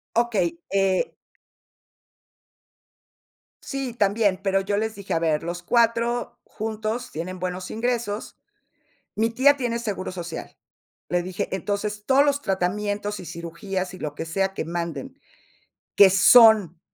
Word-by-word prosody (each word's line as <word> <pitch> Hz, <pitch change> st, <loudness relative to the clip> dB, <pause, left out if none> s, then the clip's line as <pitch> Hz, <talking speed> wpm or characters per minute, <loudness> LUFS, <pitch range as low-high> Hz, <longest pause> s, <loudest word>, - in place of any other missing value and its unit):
Okey, 215 Hz, -8 st, +1 dB, 0.2 s
eh 195 Hz, -1 st, +1 dB, 2.5 s
Sí, 270 Hz, -3 st, -4 dB
también, 205 Hz, -3 st, +1 dB
pero 195 Hz, 0 st, +1 dB
yo 200 Hz, +1 st, -1 dB
les 220 Hz, +1 st, -2 dB
dije: 200 Hz, -1 st, -5 dB
"A 165 Hz, -, +2 dB
ver, 160 Hz, -2 st, 0 dB
los 175 Hz, +1 st, -4 dB
4, 235 Hz, +3 st, +1 dB
juntos 220 Hz, +2 st, -4 dB
tienen 180 Hz, +4 st, -5 dB
buenos 180 Hz, 0 st, -4 dB
ingresos. 225 Hz, -2 st, -2 dB, 0.8 s
Mi 225 Hz, +2 st, +1 dB
tía 270 Hz, +5 st, +4 dB
tiene 240 Hz, -4 st, -2 dB
seguro 200 Hz, -5 st, -4 dB
social". 175 Hz, -2 st, -7 dB, 0.5 s
Le 175 Hz, 0 st, +1 dB
dije: 185 Hz, +1 st, -4 dB
"Entonces, 205 Hz, +2 st, -3 dB
todos 270 Hz, +2 st, +5 dB
los 285 Hz, -1 st, +1 dB
tratamientos 205 Hz, +1 st, -2 dB
y 180 Hz, -, -9 dB
cirugías, 180 Hz, +3 st, -5 dB
y -, -, -9 dB
lo 150 Hz, -1 st, -5 dB
que 160 Hz, -, -5 dB
sea 195 Hz, +4 st, -1 dB
que -, -, -3 dB
manden, 170 Hz, -, -5 dB, 0.8 s
que 200 Hz, -2 st, +8 dB
son, 200 Hz, -3 st, +6 dB
200 Hz, 130 wpm, -24 LUFS, 180-230 Hz, 2.5 s, que